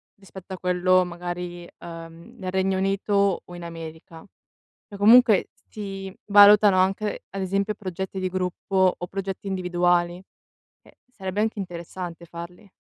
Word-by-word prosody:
rispetto 195 -1 -11
a - - -5
quello 185 0 +3
magari, 175 0 -6
uhm, 165 0 -10
nel 185 -2 -5
Regno 190 0 +1
Unito 195 0 +1
o 175 - -12
in 175 - -9
America. 165 0 -9 0.6
Cioè 205 - -9
comunque 220 0 +6 0.2
si 195 -2 -7
valutano 205 -1 +7
anche, 195 +3 0
ad 195 - -5
esempio, 195 +3 -1
progetti 190 -1 -5
di 185 - -1
gruppo 185 0 0
o 175 - -6
progetti 195 +1 -5
individuali, 175 -2 +1 0.7
ehm, - - -20 0.2
sarebbe 190 -3 -5
anche 220 -1 -1
interessante 175 -1 -7
farli. 170 +4 -10
185 Hz, 135 wpm, -24 LUFS, 175-195 Hz, 0.7 s, valutano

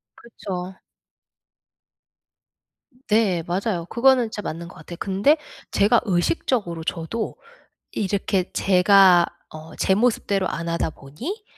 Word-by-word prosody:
그쵸. 190 -5 -7 2.3
네 210 -6 +2
맞아요. 180 -1 -2
그거는 255 +1 +4
진짜 220 -1 -6
맞는 170 -2 -6
것 180 - -13
같아요. 175 - -10
근데 200 +11 +2 0.3
제가 215 +4 +3
의식적으로 180 - -1
저도 170 +8 -4 0.6
이렇게 195 -2 -1
제가 185 -2 +5 0.3
어 155 0 -10
제 190 - +2
모습대로 200 -4 +1
안 170 0 -4
하다 170 -1 -1
보니 250 - -8
190 Hz, 230 characters per minute, -23 LUFS, 175-220 Hz, 2.3 s, 제가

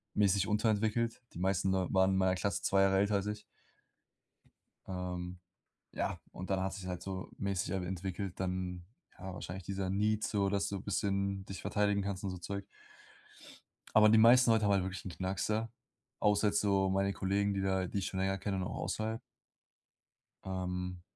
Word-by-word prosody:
mäßig 100 -2 +3
unterentwickelt. 110 +2 +1
Die - - -7
meisten 95 +1 +1
Leute 95 -1 0
waren 95 0 +4
in 95 - +2
meiner 95 -1 +3
Klasse 100 +2 -1
2 95 0 +3
Jahre 95 0 +4
älter 100 +1 +3
als 100 0 0
ich. 105 0 -3 1.5
Ähm, 90 -1 -4 0.5
ja. - - -2
Und 95 - -7
dann 95 -1 +1
hat 95 +1 -1
sich's 95 -3 -7
halt 90 -1 -4
so 95 0 -5
mäßig, 100 -3 -1
ähm, 95 -1 -1
entwickelt. 95 +1 -4
Dann 90 -1 -3 0.3
ja, 95 0 -6
wahrscheinlich 90 +1 -6
dieser 95 +1 -3
need 105 +2 +1
so, 100 -2 +1
dass 100 0 0
du 100 -2 -4
bisschen 100 -1 -1
dich 95 - -7
verteidigen 105 -1 +1
kannst 100 -1 -3
und 95 - -2
so 90 - -5
Zeug. 100 +3 -5 1.3
Aber 110 0 +8
die 110 - +6
meisten 120 +2 +7
Leute 110 -1 +3
haben 100 - +3
halt 100 -2 +3
wirklich 95 0 -5
'n - - -3
Knacks, 95 +2 -2
ja? 110 +1 0 0.5
Außer 105 0 +3
jetzt 105 0 +2
so 100 -2 +2
meine 95 +1 +1
Kollegen, 100 +1 +1
die 100 - -1
da 95 -1 +1
die 100 - -4
ich 95 - -3
schon 95 - -3
länger 95 +1 +1
kenne, 95 0 -2
und 95 - -1
auch 95 - -4
außerhalb. 110 +1 -2 1.2
Ähm, 90 -1 -3
95 Hz, 185 wpm, -33 LUFS, 95-100 Hz, 1.5 s, Aber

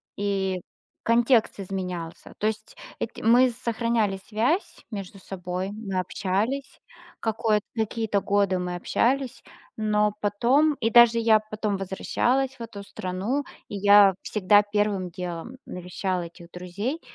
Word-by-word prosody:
и 195 -2 -1 0.4
контекст 230 -2 +3
изменялся. 180 -3 -5
То 210 - 0
есть 215 0 -4 0.2
эти 230 - -5
мы 245 +3 +5
сохраняли 230 -4 -1
связь 240 - -1
между 195 -2 -7
собой, 185 0 -4
мы 205 -3 -3
общались. 205 +9 -2 0.4
Какой-то 220 -1 +1
какие-то 220 -2 0
годы 200 -2 +2
мы 180 0 -3
общались, 255 +8 0 0.4
но 210 -1 +2
потом, 250 +9 +3
и 225 -4 0
даже 235 0 +7
я 225 -1 +5
потом 215 -1 -3
возвращалась 250 +7 0
в - - -12
эту 220 -3 -7
страну, 200 +7 -3 0.3
и - - -5
я 200 -1 +7
всегда 205 0 +4
первым 205 -3 0
делом 175 +6 -6
навещала 180 0 -3
этих 170 0 -12
друзей. 200 - -4
210 Hz, 125 wpm, -25 LUFS, 190-230 Hz, 0.4 s, даже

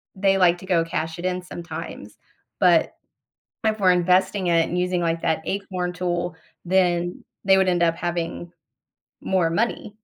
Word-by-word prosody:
they 195 0 +2
like 175 -2 +4
to 190 - -11
go 175 -3 +2
cash 160 0 -3
it 175 - -5
in 185 0 -1
sometimes, 170 -2 -8 0.4
but - - +3 0.7
if 215 0 +1
we're 185 -2 +5
investing 180 +1 +2
it 165 -1 +4
and 175 - -3
using 180 0 0
like 165 -1 -1
that 160 - +1
acorn 185 -2 -3
tool, 175 -1 -2 0.3
then 175 -1 +1 0.2
they 190 0 +5
would 190 -1 +3
end 175 -1 +2
up 165 -1 +3
having 175 0 -4 0.7
more 180 -4 +1
money. 210 +2 -2
180 Hz, 160 wpm, -23 LUFS, 170-185 Hz, 0.7 s, we're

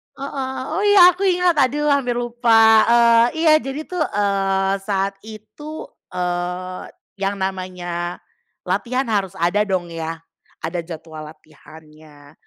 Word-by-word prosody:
Heeh, 270 -1 -5
oh, 335 +5 -1
iya 375 -3 +8
aku 365 +3 -6
ingat, 360 -2 +2
aduh 290 +2 +2
hampir 260 -4 +1
lupa. 230 -2 +4
Eee, 235 0 +5 0.2
iya 320 - +5
jadi 275 +2 -6
tuh, 360 -2 -4
eee, 195 -1 0
saat 195 0 -1
itu, 220 +9 -10 0.3
eee, 180 0 -3 0.4
yang 195 +1 -1
namanya 180 -2 -4 0.5
latihan 255 +2 -1
harus 195 -3 -1
ada 175 +5 +1
dong 180 -3 -2
ya, 165 0 -5 0.5
ada 165 +2 -3
jadwal 160 -2 -9
latihannya, 155 -1 -16
200 Hz, 125 wpm, -20 LUFS, 175-260 Hz, 0.5 s, iya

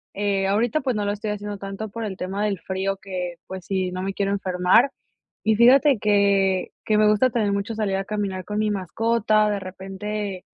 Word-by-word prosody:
Eh, 195 -1 0
ahorita, 225 +9 +1
pues, 255 -3 -1
no 210 -1 -1
lo 205 - 0
estoy 210 +1 -4
haciendo 205 -1 -5
tanto 195 +2 -6
por 230 +3 -6
el 200 -4 -4
tema 195 +3 -3
del 200 -3 -1
frío 190 +3 -2
que, 180 -3 -5
pues, 190 -1 -7
sí, 185 -1 -1
no 185 0 -4
me 195 +1 -3
quiero 200 0 0
enfermar. 190 +6 +3 0.5
Y 220 0 +3
fíjate 260 +3 +5
que 200 -2 +2
que 215 - +2
me 215 0 +5
gusta 210 +4 +4
también 220 -4 0
mucho 200 +3 -2
salir 205 -3 0
a 195 - -3
caminar 195 -3 -3
con 210 +3 -5
mi 215 0 +1
mascota. 215 +2 +1
De 205 - -1
repente, 195 +1 -5
200 Hz, 205 wpm, -23 LUFS, 190-215 Hz, 0.5 s, fíjate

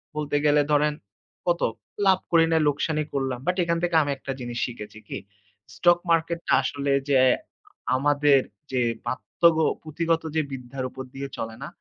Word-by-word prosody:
বলতে 150 -1 -2
গেলে 145 0 +5
ধরেন 150 0 +3 0.5
কত, 175 0 +2 0.4
লাভ 190 -1 +5
করি 165 -1 +6
নাই, 160 -1 +3
লোকসানই 155 +1 0
করলাম। 135 -3 -1
But 180 - +2
এখান 170 0 0
থেকে 175 -1 0
আমি 145 -1 -1
একটা 135 - -6
জিনিস 120 -1 -5
শিখেছি 110 -3 -8
কি, - - -5 0.6
stock 175 0 +4
market 165 +1 +1
টা - - +3
আসলে 140 +1 -1 0.2
যে 135 - +5 0.8
আমাদের 145 0 +4 0.7
পাঠ্য 130 - -6
যে 170 0 +8 0.3
পুথিগত 165 +1 0
যে 160 - +3
বিধ্যার 130 0 -6
উপর 130 0 -8
দিয়ে 135 +1 -5
চলে 110 0 -5
না? - - -5
145 Hz, 165 wpm, -25 LUFS, 135-165 Hz, 0.8 s, যে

